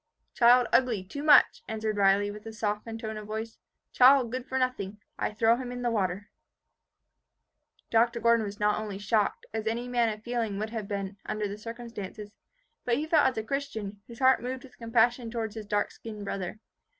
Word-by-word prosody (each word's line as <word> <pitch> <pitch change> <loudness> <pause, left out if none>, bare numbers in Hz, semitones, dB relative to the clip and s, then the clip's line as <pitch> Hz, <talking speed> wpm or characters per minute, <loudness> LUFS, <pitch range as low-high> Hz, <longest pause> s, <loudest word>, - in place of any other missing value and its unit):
"Child 245 +1 +6
ugly 240 -7 +3
too 215 +10 -7
much," 295 -1 +6
answered 220 -1 -2
Riley, 200 +1 +3
with 210 +2 -10
a 225 - -7
softened 220 +1 -3
tone 220 -1 -5
of 210 -1 -8
voice. 220 +1 -5 0.3
"Child 255 -2 +6
good 255 +1 -4
for 265 - -2
nothing. 250 -6 -1 0.2
I - - 0
throw 225 +2 +3
him 250 -1 -5
in 245 0 -5
the 240 - +1
water." 195 -2 -2 1.6
Dr. 235 +1 +3
Gordon 235 -1 +4
was 205 +1 -6
not 210 0 +2
only 210 -2 -5
shocked, 205 +1 0
as 220 0 -3
any 235 +2 -1
man 240 -2 +2
of 215 0 -6
feeling 230 -4 -2
would 215 +2 -3
have 220 -3 -4
been, 200 -1 -4
under 215 -1 -2
the 200 - -5
circumstances, 220 -3 -7 0.5
but 240 - +1
he 300 - -1
felt 315 -3 +4
as 260 - -2
a 220 - -1
Christian, 220 -6 -4
whose 235 - -11
heart 260 0 +4
moved 255 +1 -4
with 255 -2 -16
compassion 230 +1 +2
towards 225 -2 -3
his 220 -2 -8
dark 205 0 0
skinned 210 -2 -8
brother. 195 +1 -4
225 Hz, 195 wpm, -28 LUFS, 210-245 Hz, 1.6 s, Child